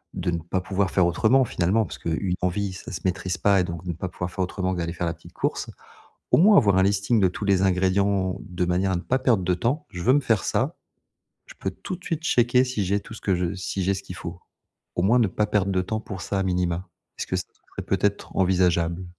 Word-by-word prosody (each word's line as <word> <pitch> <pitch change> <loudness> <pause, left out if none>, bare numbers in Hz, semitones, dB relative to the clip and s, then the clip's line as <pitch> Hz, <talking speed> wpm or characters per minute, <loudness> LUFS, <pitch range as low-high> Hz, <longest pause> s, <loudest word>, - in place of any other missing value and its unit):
de 90 - -1
ne 85 - -1
pas 85 +3 -2
pouvoir 95 +1 -1
faire 90 -1 +3
autrement, 120 +9 +3
finalement, 105 +2 +1
parce - - -9
que - - -3
une 90 +3 -1
envie, 95 +2 -1
ça 90 - -9
se - - -5
maîtrise 95 0 -1
pas 100 +2 +3
et - - +3
donc 85 -1 -5
de 90 - -6
ne - - 0
pas 90 +3 -5
pouvoir 90 0 -5
faire 95 - -13
autrement 95 +1 -2
que 90 - -3
d'aller 85 0 -2
faire 90 0 -3
la 85 - -1
petite 85 +1 -16
course. - - -2 0.6
Au - - +5
moins 205 +5 +7
avoir 100 -8 +5
un - - +5
listing 100 +4 +2
de 95 - +4
tous 90 +4 -5
les 100 -2 +3
ingrédients 95 0 +1
de 90 0 -3
manière 90 +2 +1
à - - +1
ne 85 - -3
pas 130 - +1
perdre 120 -8 +2
de 90 - +2
temps. 125 - -1
Je 90 - -6
veux 130 +6 +4
me 145 - +4
faire 115 -7 +1
ça, - - 0 0.7
je - - -13
peux - - -3
tout 185 - -6
de 180 - -20
suite 165 -2 -2
checker 125 -5 +3
si 125 -6 -2
j'ai 100 +2 +1
tout 110 - -11
ce - - -10
que 95 - +1
je 90 +1 -1
si 95 +1 -3
j'ai 95 +2 +1
ce 95 - -6
qu'il 90 - -8
faut. 85 +1 -7 0.6
Au 85 - +1
moins 110 +7 +4
ne 115 - +4
pas 105 +3 0
perdre 100 -2 +1
de 95 -1 +1
temps 110 +4 -3
pour 95 -4 -7
ça 100 - -2
à - - +1
minima. 90 0 -1 0.3
Est-ce - - -3
que - - -4
ça - - -3 0.3
serait - - -6
peut-être 100 +1 -1
envisageable? 90 -2 +2
95 Hz, 265 wpm, -25 LUFS, 90-105 Hz, 0.7 s, moins